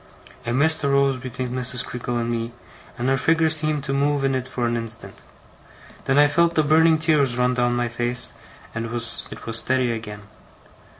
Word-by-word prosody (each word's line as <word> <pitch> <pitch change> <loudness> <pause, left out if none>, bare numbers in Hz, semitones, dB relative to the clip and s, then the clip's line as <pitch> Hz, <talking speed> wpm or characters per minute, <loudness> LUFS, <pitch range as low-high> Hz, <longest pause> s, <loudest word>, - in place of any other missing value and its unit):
A - - 0
mist 155 +6 +2
rose 140 -1 +2
between 130 0 -5
Mrs. 125 0 +1
Creakle 120 0 -4
and 120 0 -2
me, 115 0 -3 0.4
and 120 - -2
her 135 0 +2
figure 160 +3 +2
seemed 155 -2 +1
to 135 -1 -3
move 140 0 0
in 135 - +1
it 130 -1 -2
for 125 -2 -3
an 120 0 0
instant. 115 -4 -5 0.8
Then 135 0 +1
I 145 0 +6
felt 170 +3 +2
the 155 - +3
burning 160 +2 +4
tears 145 -6 +3
run 125 0 +2
down 120 -1 0
my 120 0 0
face, 120 +1 -3 0.4
and 115 0 -4
it 115 - -7
was 120 -1 -1 0.2
steady 125 +2 +1
again. 105 -2 -7
125 Hz, 185 wpm, -22 LUFS, 120-145 Hz, 0.8 s, I